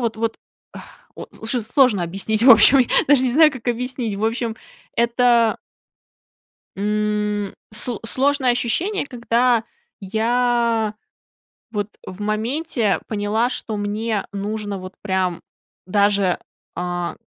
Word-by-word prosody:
вот 230 -2 -1
вот, 225 0 -2 0.4
а, - - -8 0.4
очень 230 +3 -4
сложно 245 - +3
объяснить, 200 +5 -1
в 260 - +8
общем, 250 +2 +7 0.2
даже 280 -3 +5
не 255 - +2
знаю, 305 +2 +6
как 255 -2 -6
объяснить, 245 -2 -2
в 210 - -2
общем, 225 0 -1 0.4
это 235 -1 +3 1.2
м, 210 0 -1 0.2
с 225 +1 -5
сложное 265 +1 +1
ощущение, 290 - 0
когда 240 -1 +1 0.4
я, 230 +1 0 0.8
вот, 205 -2 -2 0.2
в 185 +2 -9
моменте 220 - -1
поняла, 215 +3 0
что 225 -3 -4
мне 210 +1 -2
нужно, 205 0 -4
вот, 185 +1 -9
прям 190 -3 -1 0.5
даже, 200 -1 +2 0.4
а, 175 0 -3
220 Hz, 115 wpm, -21 LUFS, 205-245 Hz, 1.2 s, в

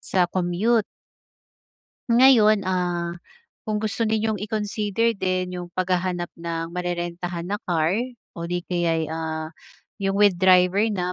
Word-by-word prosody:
sa 185 -2 +1
commute. 190 +6 +1 1.3
Ngayon, 230 -4 +6
ah, 175 -2 -1 0.6
kung 215 - 0
gusto 215 +1 -3
niyong 220 -2 0
i-consider 215 +1 -1
din 185 -2 -2
yung 175 - -7
paghahanap 180 -1 -1
ng 165 0 -4
marerentahan 175 -1 -3
na 205 +3 -3
car 165 -1 0 0.4
o 170 0 -6
di 175 0 -2
kaya'y, 165 -3 -1
ah, 160 0 -4 0.5
yung 195 0 0
with 205 -1 +5
driver 185 +1 +5
na 180 -4 -2
180 Hz, 125 wpm, -23 LUFS, 175-205 Hz, 1.3 s, Ngayon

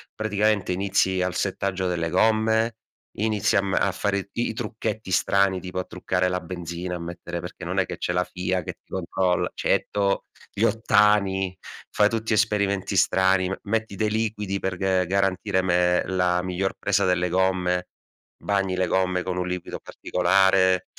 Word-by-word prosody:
praticamente 105 -2 +1
inizi 95 0 +1
al 90 0 -1
settaggio 95 -1 -1
delle 85 -2 -1
gomme, 110 +4 +2 0.4
inizia 105 -1 +2
a - - -1
m 95 -1 -2
a 100 - +2
fare 100 0 -2
i 120 - -1
i 115 - -4
trucchetti 110 -2 -4
strani 95 +1 +2
tipo 90 0 -5
a 90 - -3
truccare 90 0 -1
la 90 0 -1
benzina, 90 0 -5
a - - -5
mettere 85 0 -6
perché - - -8
non - - -1
è - - +2
che - - -6
c'è 90 - -2
la 90 +1 +2
FIA 90 0 -2
che - - -5
ti - - -37
controlla, 90 0 0
certo, 100 -1 0 0.3
gli - - -5
ottani, 100 -3 +2 0.3
fai 105 0 +3
tutti 115 0 -1
esperimenti 100 -2 +1
strani, 95 0 +3
me 95 - -4
metti 110 -1 -2
dei 105 +3 0
liquidi 105 -3 -1
per 95 -1 -3
g 95 0 +1
garantire 95 0 +1
me 90 -1 +2
la 90 -1 +1
miglior 90 +1 -1
presa 100 -1 +1
delle 90 -1 +1
gomme, 90 0 +1 0.5
bagni 95 -2 0
le 90 0 +1
gomme 90 0 +1
con 90 -1 -3
un 90 0 -1
liquido 90 -1 -5
particolare. 95 0 +2
95 Hz, 170 wpm, -24 LUFS, 90-100 Hz, 0.5 s, fai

